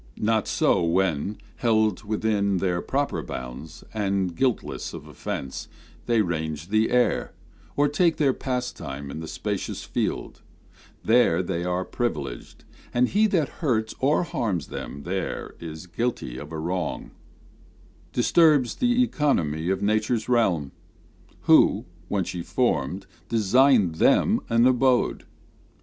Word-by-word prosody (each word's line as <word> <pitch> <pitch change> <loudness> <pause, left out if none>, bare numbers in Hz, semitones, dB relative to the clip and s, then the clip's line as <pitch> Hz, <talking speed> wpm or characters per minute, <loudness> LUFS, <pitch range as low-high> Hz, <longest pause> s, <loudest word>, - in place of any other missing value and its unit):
Not 110 0 +1
so - - +2
when, 90 +2 0 0.2
held 110 -4 +2
within 105 -2 0
their 90 -1 0
proper 140 +1 -1
bounds, 65 +6 -8
And 95 -4 -1
guiltless 125 +3 -1
of - - -9
offence, 65 -1 -5 0.4
they 115 -2 +3
range 80 -2 -3
the 110 +2 +2
air, 125 0 +1 0.4
Or 145 +1 +4
take 165 +3 +2
their 140 -3 +3
pastime 125 - -4
in 80 - -6
the 80 - -6
spacious 100 +3 -4
field: - - -3 0.6
There 110 -7 +4
they 85 -1 -2
are 90 +1 -1
privileged; 75 - -4 0.3
and 125 +1 +2
he 215 +3 +3
that 170 -9 +1
hunts 110 -8 0
Or 145 +6 +2
harms 115 - -2
them 70 - -7
there 95 +4 -4
is 80 0 -8
guilty 90 - -3
of 75 +2 -9
a 80 - -4
wrong, 85 +2 -3 1.0
Disturbs 145 -1 +4
the 245 0 +3
economy 85 - 0
of 95 +1 0
nature's 110 +2 +1
realm, 95 - +2 0.7
Who, - - +5 0.2
when 100 0 0
she 90 0 -5
formed, 90 - -1 0.2
designed 115 - +4
them - - +4
an 115 +1 +4
abode. 130 0 +2
105 Hz, 130 wpm, -25 LUFS, 85-125 Hz, 1.0 s, Who